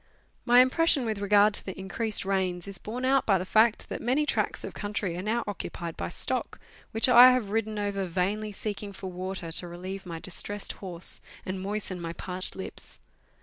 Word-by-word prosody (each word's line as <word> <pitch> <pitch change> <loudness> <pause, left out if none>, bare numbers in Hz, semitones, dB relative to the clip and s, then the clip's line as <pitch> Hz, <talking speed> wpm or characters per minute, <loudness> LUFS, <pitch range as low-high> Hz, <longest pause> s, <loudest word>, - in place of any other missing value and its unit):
My 245 0 +7
impression 275 +1 +3
with 215 -2 -2
regard 205 +1 +4
to - - +2
the 190 - -7
increased 200 +3 -2
rains 190 -2 -1
is 195 -3 -3
borne 245 +4 -4
out 270 +1 +3
by 195 -3 +5
the 180 - -4
fact 220 +3 +3
that - - -4
many 265 +5 +1
tracts - - -1
of - - -6
country 205 -4 -3
are 180 - -4
now 225 +4 0
occupied 170 -4 -5
by 85 - -4
stock, - - 0 0.3
which 225 +4 +3
I 250 +1 +9
have 230 -6 -1
ridden 220 -1 -1
over 200 -1 -1
vainly 195 +5 -1
seeking 205 0 -5
for 190 -1 -7
water 185 -2 -5
to 175 +2 -1
relieve 185 +2 -7
my 165 -1 -5
distressed 200 +4 -4
horse, 180 -3 +1 0.2
and 185 0 -4
moisten 195 -2 -2
my 165 0 -4
parched 185 +1 -5
lips. 190 - -8
200 Hz, 190 wpm, -28 LUFS, 185-220 Hz, 0.3 s, I